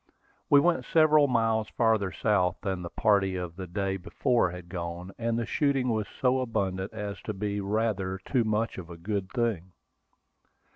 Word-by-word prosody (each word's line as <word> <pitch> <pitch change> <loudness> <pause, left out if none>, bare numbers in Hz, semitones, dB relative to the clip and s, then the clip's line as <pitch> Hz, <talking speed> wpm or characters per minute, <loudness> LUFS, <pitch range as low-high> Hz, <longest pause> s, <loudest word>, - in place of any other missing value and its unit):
We 145 - +7
went 165 -3 +2
several 155 -2 +5
miles 115 -3 +1
farther 110 -4 +1
south 90 0 +1
than 95 -2 -2
the 85 - -6
party 100 -2 +2
of 90 -2 -5
the 95 0 -6
day 95 +2 -2
before 120 +3 +1
had 90 0 -9
gone; 85 +1 -5
and 115 0 0
the 115 - -1
shooting 135 -2 +1
was 110 -3 0
so 130 0 +3
abundant 100 -6 -2
as 100 -1 -6
to 110 - -5
be 100 +1 -2
"rather 100 -2 -1
too 120 +6 0
much 110 -1 -1
of 85 -2 -9
a 85 - -9
good 100 +2 -3
thing." 110 -8 -1
105 Hz, 175 wpm, -28 LUFS, 95-115 Hz, -, We